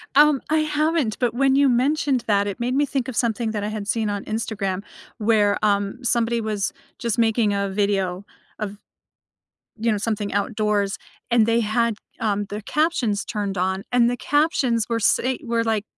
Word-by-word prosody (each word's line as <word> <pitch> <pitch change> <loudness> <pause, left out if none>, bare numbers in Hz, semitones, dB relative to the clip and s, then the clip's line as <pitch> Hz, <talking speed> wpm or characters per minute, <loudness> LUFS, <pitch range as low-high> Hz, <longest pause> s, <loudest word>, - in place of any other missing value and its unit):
Um, 295 -2 +6
I 315 - +3
haven't, 305 -5 0
but 245 -2 +1
when 270 +1 +3
you 280 -1 +5
mentioned 265 +1 +1
that, 205 -1 +2
it 200 - -4
made 245 +2 -1
me 290 +2 +3
think 270 -3 -2
of 260 - -5
something 230 0 0
that 210 -2 -3
I - - -1
had 210 -1 -5
seen 220 -1 0
on 205 -1 -3
Instagram 205 -4 -2 0.4
where, 210 -2 +3
um, 200 +2 +1
somebody 235 -1 +1
was 210 -2 -2 0.2
just 235 -1 -2
making 225 -2 +2
a 200 0 -1
video 195 -1 -1 0.3
of, 205 -1 -5 1.0
you 225 +1 +1
know, 210 - 0
something 210 -1 -2
outdoors, 205 -1 0 0.3
and 235 -2 +4
they 230 +1 +3
had, 230 +1 +1 0.3
um, 205 -2 0
their 205 +2 -5
captions 240 -6 0
turned 205 -3 -3
on, 190 +2 -1
and 240 -1 +4
the 245 - -2
captions 280 - +1
were 230 -1 0
say 255 +4 +2
were, 230 -1 0
like, 220 -2 0
225 Hz, 180 wpm, -23 LUFS, 205-245 Hz, 1.0 s, Um